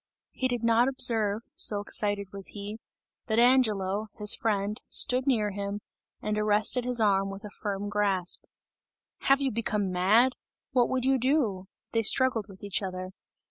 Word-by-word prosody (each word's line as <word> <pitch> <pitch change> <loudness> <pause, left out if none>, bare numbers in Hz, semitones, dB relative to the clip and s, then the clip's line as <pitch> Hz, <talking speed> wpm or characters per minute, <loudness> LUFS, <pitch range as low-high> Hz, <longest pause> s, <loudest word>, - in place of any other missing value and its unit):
He 260 - -2
did 245 -2 -3
not 230 +2 +3
observe 225 -5 +2
so 265 - +4
excited 205 -1 -1
was 195 -1 -3
he 205 +2 -7 0.5
that 220 -2 -1
Angelo, 220 -5 +2
his 210 -1 +3
friend, 210 0 -2
stood 255 +2 +2
near 215 -6 +1
him, 200 +1 -5 0.4
and 210 0 -1
arrested 215 +4 +1
his 250 -1 0
arm 195 -2 +2
with 195 +2 -8
a 210 - -9
firm 205 -1 -4
grasp. 200 -3 0 0.8
"Have 275 +1 +2
you 270 -1 0
become 210 -3 -2
mad? 215 +8 +3 0.4
What 245 -2 +2
would 260 -1 -1
you 265 0 +2
do?" 240 -8 0 0.3
They 225 - +1
struggled 225 -1 +3
with 190 0 -15
each 200 -1 -1
other. 185 -1 -6
210 Hz, 160 wpm, -27 LUFS, 200-245 Hz, 0.8 s, so